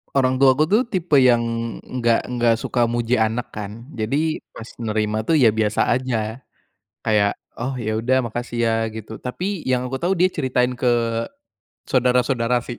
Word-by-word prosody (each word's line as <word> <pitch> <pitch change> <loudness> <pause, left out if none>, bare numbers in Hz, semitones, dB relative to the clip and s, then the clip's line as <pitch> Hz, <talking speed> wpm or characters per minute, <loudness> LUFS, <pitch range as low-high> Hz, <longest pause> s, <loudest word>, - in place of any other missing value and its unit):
Orang 130 -1 +3
tuaku 135 +4 +5
tuh 215 +6 +4
tipe 175 -5 +1
yang 120 -2 +5 0.5
enggak 120 -2 0
enggak 120 -2 +1
suka 120 +1 0
muji 120 +1 +1
anak 110 +2 0
kan 105 +4 -7
jadi 140 +8 -1
pas 115 - -10 0.2
nerima 110 0 -1
tuh 160 +4 +2
ya 120 -4 +6
biasa 105 0 +1
aja, 130 0 0 0.9
kayak, 105 -2 +2 0.2
"Oh 130 +3 -3
ya 110 -3 -2
udah 130 +3 +2
makasih 120 +1 -5
ya," 115 -1 +2 0.2
gitu 110 0 -8
tapi 180 +7 -4
yang 125 -1 +1
aku 135 - -2
tahu 180 +3 +1
dia 185 +1 +3
ceritain 125 -4 0
ke 120 -2 +2 0.8
saudara-saudara 125 -1 +2
sih. 120 - -6
125 Hz, 160 wpm, -21 LUFS, 115-130 Hz, 0.9 s, ya